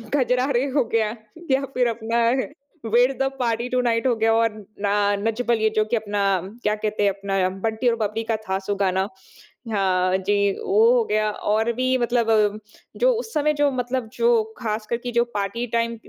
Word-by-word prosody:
कजरारे 255 -1 +1
हो 280 - +4
गया 220 -1 +1 0.4
या 265 +1 +3
फिर 250 -1 +2
अपना 230 0 0 0.6
where 245 +3 +4
the 270 - +2
party 235 0 0
to 255 - +1
night 230 -1 0
हो 245 - +2
गया 225 0 +2
और 230 0 +3 0.3
ना 200 - +1 0.3
नच 225 +3 -1
बलिये 220 -2 +2
जो 215 - +3
कि 235 - -1
अपना 210 -2 -2 0.4
क्या 210 0 +1
कहते 210 -1 -2
हैं 200 - +4
अपना 195 -1 -1
बंटी 225 +2 0
और 235 - +3
बबली 220 0 -2
का 225 0 -1
था 190 - +1
सो 200 +1 -3
गाना। 190 -1 0 0.7
हाँ 185 -2 +1
जी, 200 +1 +1
वो 440 +4 +4
हो 485 -2 +3
गया 215 - +1
और 220 +3 0
भी 255 +2 +1
मतलब 225 -4 +2 0.4
जो - - +4
उस 455 -2 -7
समय 300 0 +2
जो 290 -1 +2
मतलब 250 -1 -2
जो 235 -1 +3
ख़ास 215 -2 -3
करके 240 +1 -3
जो 235 0 +3
पार्टी 210 +4 -2
टाइम 230 0 -1
225 Hz, 185 wpm, -23 LUFS, 210-245 Hz, 0.7 s, हो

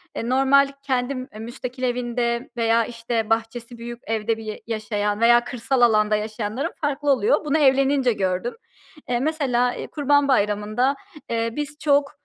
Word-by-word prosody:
eee, 230 - -3
normal 270 +2 +4
kendim 255 -1 -2
müstakil 245 +3 -7
evinde 240 -1 -1
veya 230 0 +2
işte 230 -1 -3
bahçesi 230 +1 -2
büyük 235 0 -7
evde 225 0 -1
bir 225 - -9
y 215 -1 -6
yaşayan 210 -2 -2
veya 240 +1 +6
kırsal 245 +1 -1
alanda 215 -2 +4
yaşayanların 220 +7 -3
farklı 290 -1 0
oluyor. 320 - +2
Bunu 300 +1 +2
evlenince 270 -3 +3
gördüm. 190 +3 -1 0.6
Eee, 240 -1 +1
mesela, 260 -4 +1
e, - - -6
Kurban 285 -1 +2
Bayramı'nda, 215 +2 +1 0.3
eee, 230 0 0
biz 295 0 -4
çok 285 -2 +2
240 Hz, 145 wpm, -23 LUFS, 225-270 Hz, 0.6 s, veya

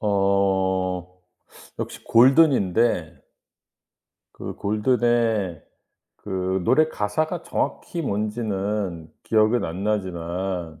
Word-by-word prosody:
어. 95 -2 0 0.6
역시 - - -6
Golden인데 120 - +3 1.1
그 - - -7
Golden의 110 - +1 0.5
그 95 -1 -2
노래 155 0 +4
가사가 155 - -2
정확히 170 -1 -3
뭔지는 105 - -3
기억은 110 +2 +2
안 90 +5 -5
나지만 90 -4 -3
100 Hz, 210 characters per minute, -23 LUFS, 95-115 Hz, 1.1 s, 노래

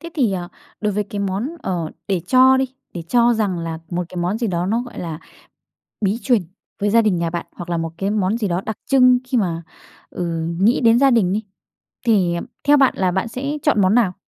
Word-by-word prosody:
Thế 335 0 -8
thì, 245 -10 +1
à, 175 -2 -4 0.3
đối 210 -1 0
với 210 +1 -1
cái 205 +1 -7
món, 200 +6 -2
ờ, 170 -4 -2 0.2
để 190 -3 +1
cho 260 +5 +6
đi 265 0 -1 0.2
để 170 - -5
cho 240 +1 +4
rằng 200 -5 -1
là 165 -1 -4
một 175 0 -2
cái - - -11
món 180 +5 -1
gì 235 - -1
đó 175 -2 -1
nó, 225 +5 +1
gọi 245 - -10
là, 165 -3 -5 0.9
bí 200 +3 +1
truyền 240 -5 +2 0.4
với 205 - +1
gia 230 +2 +5
đình 210 -5 +1
nhà 170 0 -1
bạn, 170 0 -4
hoặc 175 0 -8
là 170 - 0
một 165 0 -3
cái 195 +2 -1
món 210 +1 0
gì 210 -4 -1
đó 175 +1 -1
đặc 220 - -4
trưng 255 -2 +5
khi 255 - 0
mà, 170 -5 -1 0.5
ừ, 175 - -4 0.3
nghĩ 230 +7 +3
đến 230 +1 +5
gia 275 -1 +5
đình 195 -6 +3
đi, 215 - -1 0.6
thì 190 -7 +3 0.3
theo 290 +1 +5
bạn 270 -2 +4
là 185 -2 +1
bạn 190 +4 -1
sẽ 275 +6 -4
chọn 260 -9 +3
món 190 +4 +3
nào? 215 -7 +3
205 Hz, 235 wpm, -20 LUFS, 180-240 Hz, 0.9 s, cho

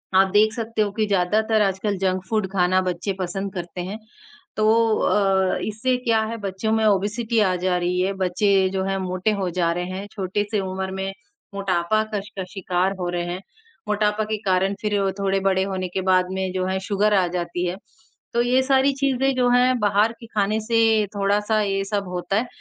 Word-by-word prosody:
आप 190 +1 +6
देख 215 +1 +4
सकते 225 -1 -2
हो 205 - -2
कि 215 0 0
ज़्यादातर 210 +3 +2
आजकल 195 +1 -1
जंक 185 -1 0
फूड 215 -3 0
खाना 185 0 +3
बच्चे 185 +2 -2
पसंद 190 +2 -3
करते 175 -1 -5
हैं 190 +4 -5 0.6
तो 215 - +2 0.3
अ, 190 -2 +2
इससे 230 +5 0
क्या 225 -2 +3
है 230 +1 -4
बच्चों 200 +1 -3
में 220 0 +2
ओबेसिटी 215 +3 +1
आ 190 -3 +3
जा 180 0 0
रही 180 +1 -1
है। 190 +2 0
बच्चे 190 +1 +2
जो 190 0 0
हैं 195 0 -1
मोटे 185 +2 -1
हो 185 - 0
जा 170 -1 +1
रहे 175 +1 -3
हैं, 195 +2 -5
छोटी-सी 205 +2 -2
उम्र 190 0 -4
में 190 0 -3 0.4
मोटापा 195 +1 +1
कस 205 0 -3
का 190 - -2
शिकार 185 0 0
हो 175 -1 -2
रहे 175 0 -2
हैं। 180 +2 -5 0.5
मोटापा 210 0 +1
के 215 0 -2
कारण 190 +1 +2
फिर 210 -1 -1 0.3
थोड़े 195 0 +1
बड़े 190 -1 +2
होने 190 -1 -3
के 190 +2 -3
बाद 185 -1 +3
में 190 -1 -2
जो 185 -1 -1
है 190 0 -1
सुगर 210 +1 +2
आ 190 -3 +3
जाती 175 0 -3
है, 175 - -2 0.6
तो 235 - +2
ये 250 +2 +3
सारी 270 +1 +3
चीज़ें 270 -1 +1
जो 250 -1 +2
हैं 250 +1 +4
बाहर 210 +1 +3
के 230 - -11
खाने 215 0 0
से 225 -2 +3
थोड़ा-सा 205 +2 +1
ये 195 -1 0
सब 200 -1 -2
होता 180 +2 -2
है। 240 +3 0
195 Hz, 200 wpm, -23 LUFS, 185-215 Hz, 0.6 s, आप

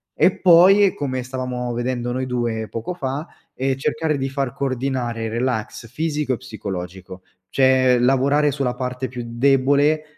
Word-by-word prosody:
e 185 - +3
poi, 190 +3 +6
come 130 -3 -3
stavamo 125 -1 -4
vedendo 120 0 -2
noi 130 +1 -2
2 120 -3 -2
poco 115 +10 -4
fa, 140 -2 -4 0.3
ehm, 135 0 0
cercare 155 +2 -1
di 135 0 -2
far 135 -1 -2
coordinare 130 -4 -2
relax 115 -1 -3
fisico 150 +1 -1
e - - -2
psicologico, 95 -3 -7 0.3
cioè 130 +1 +4
lavorare 135 +4 +3
sulla 135 -3 -2
parte 125 +1 -3
più 125 -1 -7
debole, 140 +5 +2
130 Hz, 140 wpm, -21 LUFS, 120-140 Hz, 0.3 s, poi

